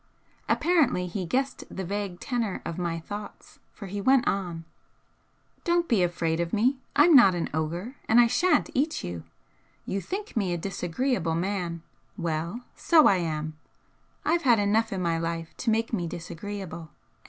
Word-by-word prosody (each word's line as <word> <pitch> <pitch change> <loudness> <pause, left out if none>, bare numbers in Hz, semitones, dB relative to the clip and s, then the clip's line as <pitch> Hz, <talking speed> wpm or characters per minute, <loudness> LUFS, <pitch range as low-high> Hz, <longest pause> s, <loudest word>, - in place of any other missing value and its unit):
Apparently 290 - +2
he 180 0 -4
guessed 265 +8 -1
the 190 - -5
vague 200 -1 -3
tenor 235 -6 -2
of 170 +1 -4
my 170 -2 -2
thoughts, 205 +5 -9
for 205 - -10
he 200 +1 -4
went 260 +3 +4
on: 175 -4 -2 1.0
"Don't 345 -1 +2
be 225 -6 +3
afraid 170 -2 0
of 170 0 -2
me! 250 +5 +2 0.2
I'm 305 +2 +6
not 195 -9 +8
an 170 - -2
ogre, 170 - -3
and 225 - +5
I 240 - +8
shan't 300 +7 +2
eat 305 +4 0
you! 85 -2 -6 0.6
You 195 - -2
think 410 - -5
me 195 -6 0
a - - -1
disagreeable 180 +1 -1
man 175 -2 -2 0.3
well, 170 +6 -2
so 320 -3 +5
I 195 - +5
am. 155 -2 -3 0.7
I've 335 +2 +2
had 245 -6 +5
enough 215 +2 +2
in 190 -2 -2
my 165 -1 +1
life 165 0 -4
to 245 - -1
make 225 +1 0
me 175 -6 -1
disagreeable. 170 0 -7
195 Hz, 165 wpm, -27 LUFS, 170-240 Hz, 1.0 s, not